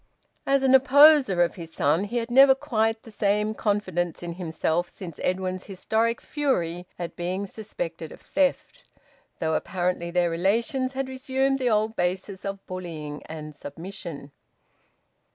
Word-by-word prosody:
As 275 Hz, 0 st, +3 dB
an 265 Hz, -1 st, +4 dB
opposer 270 Hz, -, +7 dB
of 170 Hz, -, -1 dB
his 165 Hz, -3 st, -9 dB
son 160 Hz, +6 st, +1 dB
he 235 Hz, +4 st, -3 dB
had 235 Hz, 0 st, -2 dB
never 270 Hz, +2 st, +8 dB
had -, -, -26 dB
quite 225 Hz, -1 st, 0 dB
the 225 Hz, -, -12 dB
same 210 Hz, +1 st, +1 dB
confidence 185 Hz, -6 st, -1 dB
in 170 Hz, -1 st, -4 dB
himself 170 Hz, 0 st, -1 dB
since 170 Hz, -5 st, -9 dB
Edwin's 185 Hz, 0 st, -2 dB
historic 220 Hz, +4 st, 0 dB
fury 180 Hz, -, -1 dB
at 175 Hz, -1 st, -5 dB
being 185 Hz, +3 st, -2 dB
suspected 175 Hz, -6 st, -6 dB
of -, -, -11 dB
theft, 290 Hz, -, -1 dB, 0.5 s
though 160 Hz, 0 st, -1 dB
apparently 175 Hz, 0 st, -1 dB
their 175 Hz, -1 st, +1 dB
relations 230 Hz, +9 st, 0 dB
had 270 Hz, 0 st, -2 dB
resumed 265 Hz, +1 st, 0 dB
the 250 Hz, -2 st, +1 dB
old 215 Hz, 0 st, +1 dB
basis 190 Hz, +1 st, -2 dB
of 195 Hz, 0 st, -5 dB
bullying 160 Hz, -5 st, -6 dB
and 155 Hz, -1 st, -8 dB
submission. 165 Hz, -1 st, -8 dB
195 Hz, 150 wpm, -25 LUFS, 175-240 Hz, 0.5 s, never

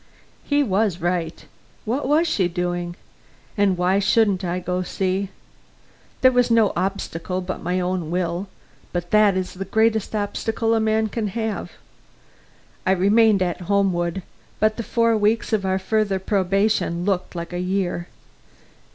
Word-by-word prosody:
He 290 Hz, 0 st, +2 dB
was 200 Hz, -5 st, +1 dB
right; 175 Hz, -2 st, -2 dB, 0.4 s
what 255 Hz, +5 st, -1 dB
was 310 Hz, +4 st, +3 dB
she 195 Hz, -, +1 dB
doing? 175 Hz, 0 st, -3 dB, 0.6 s
And 200 Hz, -4 st, +2 dB
why 180 Hz, +2 st, +2 dB
shouldn't 200 Hz, -2 st, +2 dB
I 175 Hz, 0 st, -1 dB
go 180 Hz, 0 st, -2 dB
see? 190 Hz, +1 st, -1 dB, 0.9 s
There 255 Hz, -, +6 dB
was 245 Hz, -1 st, +2 dB
no 225 Hz, -3 st, +4 dB
obstacle 185 Hz, -1 st, -2 dB
but 185 Hz, 0 st, -5 dB
my 180 Hz, +2 st, -1 dB
own 180 Hz, -3 st, -2 dB
will, 175 Hz, +2 st, -2 dB, 0.5 s
but 175 Hz, -1 st, -3 dB
that 210 Hz, -3 st, +5 dB
is 185 Hz, -1 st, -3 dB
the 190 Hz, 0 st, -5 dB
greatest 220 Hz, +2 st, +1 dB
obstacle 225 Hz, +2 st, -1 dB
a 225 Hz, -, +3 dB
man 220 Hz, 0 st, +1 dB
can 220 Hz, 0 st, -2 dB
have. 220 Hz, 0 st, -3 dB, 1.1 s
I 190 Hz, -, +3 dB
remained 200 Hz, +1 st, +4 dB
at 175 Hz, 0 st, -3 dB
Homewood, 190 Hz, -2 st, +1 dB, 0.4 s
but 215 Hz, 0 st, +2 dB
the -, -, -2 dB
four 230 Hz, 0 st, +2 dB
weeks 220 Hz, +2 st, +1 dB
of 195 Hz, -3 st, +1 dB
our 190 Hz, 0 st, +1 dB
further 200 Hz, 0 st, 0 dB
probation 195 Hz, -2 st, 0 dB
looked 190 Hz, -3 st, -1 dB
like 170 Hz, 0 st, -5 dB
a 175 Hz, -, -2 dB
year. 180 Hz, -1 st, -1 dB
195 Hz, 150 wpm, -22 LUFS, 180-220 Hz, 1.1 s, There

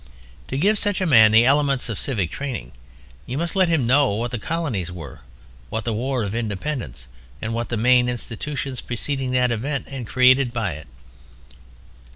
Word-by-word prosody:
To 130 Hz, -, -3 dB
give 205 Hz, +7 st, +3 dB
such 205 Hz, -2 st, 0 dB
a 185 Hz, -, 0 dB
man 110 Hz, -9 st, +7 dB
the 110 Hz, +2 st, +6 dB
elements 140 Hz, -1 st, +2 dB
of 115 Hz, -4 st, -4 dB
civic 100 Hz, -, -2 dB
training 125 Hz, -, -5 dB, 0.6 s
you 125 Hz, -, -4 dB
must 170 Hz, +4 st, -2 dB
let 190 Hz, -2 st, +4 dB
him 160 Hz, -7 st, +1 dB
know 135 Hz, +3 st, +4 dB
what 120 Hz, +2 st, -2 dB
the 120 Hz, -, -3 dB
Colonies 125 Hz, -, -3 dB
were, 80 Hz, -7 st, -9 dB, 0.5 s
what 110 Hz, -1 st, -3 dB
the 115 Hz, -, -1 dB
War 125 Hz, +2 st, -1 dB
of 100 Hz, 0 st, -3 dB
Independence, 105 Hz, -, -4 dB, 0.3 s
and 110 Hz, +1 st, -4 dB
what 120 Hz, +1 st, -3 dB
the 120 Hz, -, -1 dB
main 125 Hz, +2 st, +4 dB
institutions 125 Hz, +3 st, -4 dB
preceding 130 Hz, +2 st, -3 dB
that 125 Hz, -1 st, +2 dB
event 135 Hz, +5 st, -2 dB
and 135 Hz, -4 st, -7 dB
created 130 Hz, 0 st, +4 dB
by 115 Hz, -6 st, -2 dB
it. 75 Hz, 0 st, -10 dB
125 Hz, 180 wpm, -22 LUFS, 110-140 Hz, 0.6 s, man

